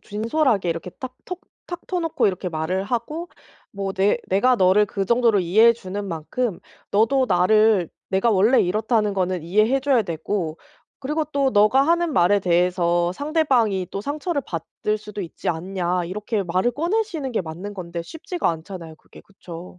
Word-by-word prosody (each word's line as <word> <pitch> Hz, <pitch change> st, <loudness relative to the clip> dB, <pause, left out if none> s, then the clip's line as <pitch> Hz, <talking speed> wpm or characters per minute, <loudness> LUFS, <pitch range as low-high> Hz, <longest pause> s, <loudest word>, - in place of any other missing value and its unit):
진솔하게 220 Hz, -, 0 dB
이렇게 165 Hz, +2 st, -4 dB
딱 255 Hz, +7 st, -9 dB
톡 365 Hz, 0 st, -6 dB, 0.3 s
탁 350 Hz, -, -7 dB
터 365 Hz, -1 st, -2 dB
놓고 330 Hz, -2 st, +1 dB
이렇게 185 Hz, -1 st, -1 dB
말을 170 Hz, +3 st, -2 dB
하고 250 Hz, -, -3 dB, 0.4 s
뭐 195 Hz, -1 st, -4 dB
"내 195 Hz, +4 st, +2 dB
내가 245 Hz, +7 st, +3 dB
너를 190 Hz, +2 st, +4 dB
그 195 Hz, 0 st, -3 dB
정도로 235 Hz, -1 st, +3 dB
이해해 215 Hz, +7 st, +5 dB
주는 205 Hz, -2 st, -6 dB
만큼 190 Hz, +5 st, -3 dB, 0.3 s
너도 255 Hz, +6 st, +3 dB
나를 205 Hz, 0 st, +4 dB, 0.2 s
내가 195 Hz, +5 st, +1 dB
원래 215 Hz, +6 st, +4 dB
이렇다는 210 Hz, +2 st, +1 dB
거는 185 Hz, -2 st, -1 dB
이해해 215 Hz, +9 st, +2 dB
줘야 270 Hz, -3 st, +2 dB
되고 170 Hz, -1 st, -3 dB, 0.4 s
그리고 300 Hz, +3 st, -2 dB
또 280 Hz, -2 st, 0 dB
너가 215 Hz, +5 st, +4 dB
하는 340 Hz, -1 st, +2 dB
말에 190 Hz, +2 st, +3 dB
대해서 175 Hz, -1 st, +1 dB
상대방이 255 Hz, -, +1 dB
또 195 Hz, -, -3 dB
상처를 290 Hz, -, -2 dB
받을 180 Hz, +5 st, -3 dB
수도 210 Hz, -1 st, -8 dB
있지 175 Hz, -4 st, -5 dB
않냐." 180 Hz, +1 st, -1 dB
이렇게 210 Hz, +3 st, -2 dB
말을 185 Hz, +7 st, 0 dB
꺼내시는 335 Hz, -, -1 dB
게 230 Hz, -, 0 dB
맞는 175 Hz, +4 st, -7 dB
건데 170 Hz, -2 st, -6 dB
쉽지가 325 Hz, -, -3 dB
않잖아요, 165 Hz, 0 st, -8 dB
그게. -, -, -17 dB
그쵸. 180 Hz, -2 st, -11 dB
205 Hz, 340 characters per minute, -22 LUFS, 180-255 Hz, 0.4 s, 이해해